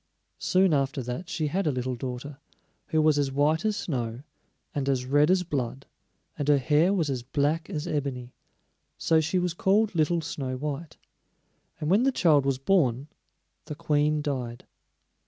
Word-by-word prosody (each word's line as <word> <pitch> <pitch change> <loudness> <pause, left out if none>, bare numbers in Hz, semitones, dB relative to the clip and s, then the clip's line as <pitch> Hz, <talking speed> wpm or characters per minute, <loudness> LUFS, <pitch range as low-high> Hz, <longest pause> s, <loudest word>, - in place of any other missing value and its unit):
Soon 185 -2 +3
after 135 -2 0
that 125 +10 -5
she 155 - -2
had 180 +5 -1
a - - +3
little 130 -1 -2
daughter, 130 +3 -6 0.5
who 160 -3 +1
was 155 -2 +4
as 140 -2 0
white 145 +3 +2
as 215 -1 0
snow, 125 - -3 0.5
and 140 -1 -1
as 130 -2 0
red 145 +4 +3
as 185 0 +3
blood, 135 -5 -3 0.5
and 145 - -2
her 145 -1 +5
hair 150 +7 +3
was 175 -6 +1
as 130 -2 -2
black 145 +6 -1
as 155 -6 -3
ebony; 130 -4 -3 0.6
so 160 -1 +3
she 160 +4 -1
was 180 -1 0
called 200 +4 +2
Little 165 +1 +1
Snow 135 -4 -4
white. 150 +3 -5 0.8
And 150 +2 -1
when 200 +4 +5
the 270 +2 +3
child 150 - +3
was 135 -2 +1
born, 135 -3 +1 0.6
the 150 - -6
Queen 150 0 +1
died. 125 -5 -4
145 Hz, 170 wpm, -27 LUFS, 135-165 Hz, 0.8 s, her